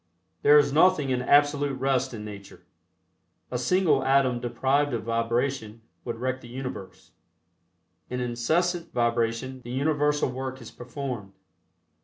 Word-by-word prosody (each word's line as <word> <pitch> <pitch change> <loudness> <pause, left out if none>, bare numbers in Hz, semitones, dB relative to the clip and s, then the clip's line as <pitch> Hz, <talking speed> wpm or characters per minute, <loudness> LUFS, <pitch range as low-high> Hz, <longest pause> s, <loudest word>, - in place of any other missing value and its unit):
There 150 +1 +7
is 145 -1 +3
nothing 155 -4 +4
in 125 -1 0
absolute 145 0 +3
rest 130 -1 +1
in 110 -3 -7
nature. 100 -2 -11 0.9
A 125 - -2
single 155 -1 +2
atom 135 -2 +3
deprived 130 +3 0
of 115 - -4
vibration 115 0 -2 0.2
would 120 - -3
wreck 130 +2 -2
the - - -12
universe. 125 -6 -8 1.0
In 125 - -3
incessant 160 +9 0
vibration 120 +2 -1
the 120 - -11
universal 145 +1 +1
work 130 0 -5
is 115 -3 -11
performed. 125 -5 -6
130 Hz, 130 wpm, -26 LUFS, 120-145 Hz, 1.0 s, There